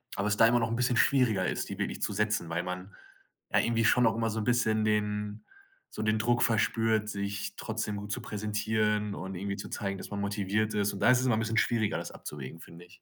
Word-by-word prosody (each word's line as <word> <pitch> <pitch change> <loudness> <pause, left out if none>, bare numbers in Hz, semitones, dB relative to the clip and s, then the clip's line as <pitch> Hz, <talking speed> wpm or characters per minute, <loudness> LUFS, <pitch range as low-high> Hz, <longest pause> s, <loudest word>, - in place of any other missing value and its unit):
aber 100 +1 -1
es 105 - +2
da 115 - +6
immer 120 +1 +3
noch 115 - +1
'n 115 - -1
bisschen 125 0 +1
schwieriger 115 -8 +3
ist, - - -2
die - - -5
wirklich - - -3
zu - - 0
setzen, 105 -4 0
weil 85 +1 -1
man 90 +2 -6 0.6
ja - - +5
irgendwie 115 -1 +1
schon 125 +2 +4
auch 110 - +3
immer 115 -1 0
so 110 +1 -2
'n - - -2
bisschen 110 -3 +2
den 105 0 -1 0.4
so - - -6
den 110 0 +1
Druck 120 +2 +2
verspürt, 110 -1 +2
sich 100 -1 -4
trotzdem 105 - -3
gut 100 0 -6
zu - - -2
präsentieren 105 0 -1
und 95 0 -6
irgendwie 100 +2 -3
zu 100 - -7
zeigen, 100 -3 -3
dass - - -8
man 100 - -4
motiviert 100 +1 -1
ist 105 -1 +1
und 100 - -7
da - - +4
ist 125 - +6
es - - -1
immer 120 -4 +3
'n - - 0
bisschen 115 0 -1
schwieriger, 110 -3 +2
das - - -5
abzuwägen, 75 +2 -8
finde 85 +1 -12
ich. 90 0 -19
105 Hz, 245 wpm, -30 LUFS, 100-115 Hz, 0.6 s, da